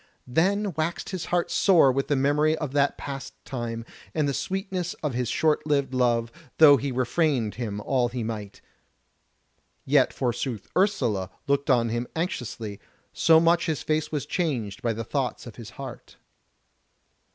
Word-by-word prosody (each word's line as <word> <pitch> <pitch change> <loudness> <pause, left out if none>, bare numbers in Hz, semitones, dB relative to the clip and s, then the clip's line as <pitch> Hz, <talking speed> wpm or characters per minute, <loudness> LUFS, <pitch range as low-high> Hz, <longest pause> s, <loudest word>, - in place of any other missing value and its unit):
Then 190 +9 +1
waxed 160 +2 -2
his 185 -4 -4
heart 175 -1 0
sore 170 -9 +5
with 135 +1 -1
the 145 - +2
memory 150 +3 +2
of 150 -4 -4
that 140 0 +1
passed 135 -1 -6
time, 115 -3 -4 0.3
and 155 -2 +1
the 140 - 0
sweetness 190 +1 -3
of 150 -4 -1
his 125 -1 -1
short 155 -1 +1
lived 140 -3 +1
love, 120 -2 +1 0.3
though 145 -3 +8
he 140 +1 -3
refrained 130 -2 +1
him 110 -4 -4
all 120 +3 +1
he 120 -1 -4
might: 105 -3 -6 1.2
yet 135 -1 +4
forsooth 120 -3 -3
Ursula 125 - +1 0.2
looked 140 +1 0
on 120 -3 +3
him 120 +2 -2
anxiously, 120 - -4 0.3
so 160 -1 +5
much 170 +1 +3
his 155 -3 -1
face 155 0 -1
was 145 -3 -2
changed 130 - -2
by 115 - 0
the 115 +1 -4
thoughts - - -2
of - - -10
his - - -9
heart. - - -9
140 Hz, 160 wpm, -26 LUFS, 120-160 Hz, 1.2 s, though